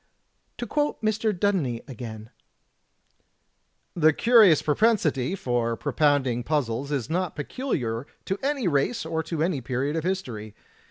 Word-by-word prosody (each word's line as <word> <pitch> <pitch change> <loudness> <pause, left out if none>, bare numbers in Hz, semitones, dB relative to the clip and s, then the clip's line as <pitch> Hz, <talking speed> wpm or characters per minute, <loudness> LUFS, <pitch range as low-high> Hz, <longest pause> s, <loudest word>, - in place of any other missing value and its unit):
To 240 - -4
quote 295 +6 -1
Mr. 215 0 +1
Dudeney 175 - 0
again: 110 -4 -8 1.6
"The 155 -2 +4
curious 220 - +5
propensity 160 - +2
for 120 -7 -1
propounding 135 -5 +1
puzzles 140 -2 -1
is 135 -6 -1
not 180 0 -2
peculiar 140 - -3 0.2
to 195 - -2
any 275 -6 0
race 155 - 0
or 160 0 -1
to 160 -1 -2
any 165 -6 0
period 130 +5 -2
of 160 - -1
history. 125 - -4
150 Hz, 125 wpm, -25 LUFS, 125-195 Hz, 1.6 s, curious